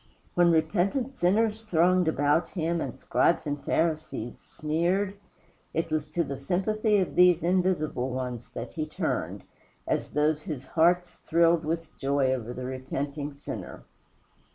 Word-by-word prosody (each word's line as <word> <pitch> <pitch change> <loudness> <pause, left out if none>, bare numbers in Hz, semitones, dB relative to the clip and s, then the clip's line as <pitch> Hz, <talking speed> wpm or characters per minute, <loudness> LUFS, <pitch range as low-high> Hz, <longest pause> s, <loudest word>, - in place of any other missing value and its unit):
When 175 -1 +4
repentant 200 - +1
sinners 215 +3 +2
thronged 180 -3 +3
about 145 +1 +2
him 170 -1 -1
and - - -4
Scribes 170 - +2
and 145 -1 -3
Pharisees 155 -7 -1
sneered, 175 +6 -1 0.6
it 165 0 -1
was 155 -1 0
to 170 +3 0
the 140 -2 -5
sympathy 210 - +1
of 190 -3 0
these 180 -2 +5
invisible 175 -7 +1
ones 125 -2 -4
that 115 - -5
he 155 -2 -3
turned, - - -3 0.4
as - - -1
those 150 +1 +1
whose 145 -5 -6
hearts 175 +4 +2
thrilled 170 0 +4
with 165 0 -3
joy 135 -1 +1
over 120 -2 -4
the 125 +1 -5
repenting 140 +3 -4
sinner. 140 0 -7
160 Hz, 140 wpm, -27 LUFS, 145-180 Hz, 0.6 s, these